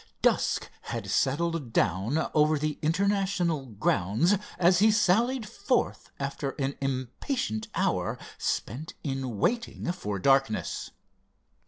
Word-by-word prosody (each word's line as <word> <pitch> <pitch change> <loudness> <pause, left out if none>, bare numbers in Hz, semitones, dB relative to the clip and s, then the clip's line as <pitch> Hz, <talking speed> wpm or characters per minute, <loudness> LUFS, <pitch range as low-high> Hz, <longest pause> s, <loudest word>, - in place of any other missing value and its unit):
Dusk - - +2 0.2
had 105 -5 -4
settled 145 -1 0
down 100 - +1
over 155 0 +4
the 150 0 -2
International 180 -3 +1
grounds 105 - +1 0.2
as 175 0 +5
he 215 +2 +6
sallied 220 +4 +2
forth 205 +6 -1
after 140 0 -3
an 135 0 -1
impatient 130 - -2
hour - - 0 0.2
spent 150 +7 -3
in 135 -5 -3
waiting 235 - 0
for 105 - -4
darkness. 135 0 +1
150 Hz, 110 wpm, -28 LUFS, 125-185 Hz, 0.2 s, he